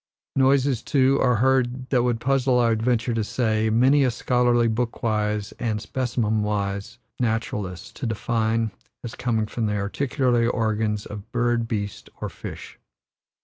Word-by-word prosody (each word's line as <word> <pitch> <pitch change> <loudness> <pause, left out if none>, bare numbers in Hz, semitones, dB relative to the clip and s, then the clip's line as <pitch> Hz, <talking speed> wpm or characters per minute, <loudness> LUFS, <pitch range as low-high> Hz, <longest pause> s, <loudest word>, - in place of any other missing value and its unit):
Noises, 135 -2 +3
too, 135 0 +2
are 125 -2 +3
heard, 130 +1 +1
that 125 -3 +4
would 120 -1 0
puzzle, 130 0 +2
I 115 -1 +3
venture 115 +1 0
to 115 -1 0
say, 110 -1 0
many 130 +6 +4
a 130 - +3
scholarly, 120 0 +2
book 115 +1 -2
wise 105 -2 0
and 110 -3 -1
specimen 115 -3 -1
wise 100 +1 -2 0.2
naturalist 110 -6 -3
to 130 - -3
define 115 -1 0 0.3
as 120 -1 -6
coming 115 -3 0
from 110 +1 -2
the 105 - -1
articulatory 120 +3 +1
organs 110 -2 -1
of 105 -1 -9
bird, 120 -1 +1
beast, 105 -3 -4
or - - -3
fish. - - -9
115 Hz, 145 wpm, -24 LUFS, 110-125 Hz, 0.3 s, that